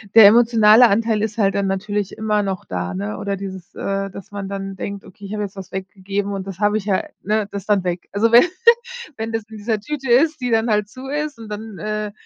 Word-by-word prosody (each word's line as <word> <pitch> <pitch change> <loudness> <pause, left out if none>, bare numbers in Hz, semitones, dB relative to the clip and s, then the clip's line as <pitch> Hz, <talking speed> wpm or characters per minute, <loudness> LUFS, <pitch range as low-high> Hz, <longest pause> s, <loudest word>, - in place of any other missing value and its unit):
Der 225 -2 +11
emotionale 225 +1 +6
Anteil 220 +1 +1
ist 220 +1 -2
halt 195 -3 +2
dann 200 -1 +1
natürlich 200 +1 -2
immer 215 -1 +1
noch 190 -2 -3
da, 90 0 -4
ne? 105 +3 -4
Oder 200 0 -2
dieses, 190 -2 -8
äh, 195 0 -2
dass 195 +1 -11
man 200 -1 -5
dann 195 -1 -5
denkt: 200 0 -5
„Okay, 195 +1 -16
ich 200 - -6
habe 210 -1 -2
jetzt 200 0 -6
was 190 - -8
weggegeben 195 +1 -4
und 195 -1 -5
das 195 -2 -7
habe 205 0 +2
ich 205 - -5
ja 195 -3 +1 0.2
ne, 210 0 0
das 200 -2 -6
dann 205 -3 +2
weg.“ 175 0 -3
Also, 225 +3 +2
wenn 240 - +9 0.7
wenn 225 +1 -4
das 225 -1 -1
in 220 - -9
dieser 215 0 -1
Tüte 270 +3 -5
ist, 305 +5 +4
die 250 - -1
dann 225 +1 +2
halt 210 -1 +1
zu 255 +5 -10
ist 295 -1 -3
und 220 -2 -9
dann, 210 -1 -7
äh, 215 0 -3
205 Hz, 240 wpm, -20 LUFS, 195-220 Hz, 0.7 s, Der